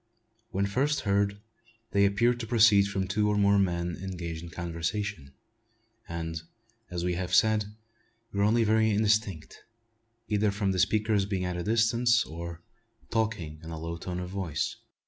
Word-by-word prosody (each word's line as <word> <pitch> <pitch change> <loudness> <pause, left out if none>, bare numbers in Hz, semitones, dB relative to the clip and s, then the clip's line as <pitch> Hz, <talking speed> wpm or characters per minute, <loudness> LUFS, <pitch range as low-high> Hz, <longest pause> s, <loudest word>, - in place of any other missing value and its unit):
When 100 -3 0
first 135 +9 0
heard, 100 0 +1 0.5
they 100 0 +4
appeared 120 +5 +2
to 115 - -5
proceed 110 -4 +5
from 95 -1 -2
two 105 +2 +1
or 105 - +1
more 100 0 +4
men 85 -2 0
engaged 85 -4 -5
in 85 - -8
conversation; 85 -2 -4 0.7
and, 80 -1 -4 0.5
as 85 -1 -3
we 90 0 0
have 90 +1 -1
said, 110 0 +4 0.7
were 100 - 0
only 110 +3 +4
very 110 0 +3
indistinct, 105 -5 0 0.7
either 105 0 +2
from 100 -1 0
the 95 - -1
speakers 105 +1 +2
being 95 -3 -1
at 90 0 -2
a 90 - -3
distance 115 +3 +3
or 85 +1 -7 0.5
talking 105 -9 -1
in 80 - -9
a 80 - -5
low 85 +1 -4
tone 90 +1 -5
of 90 0 -5
voice. 90 -7 -2
100 Hz, 160 wpm, -28 LUFS, 85-105 Hz, 0.7 s, proceed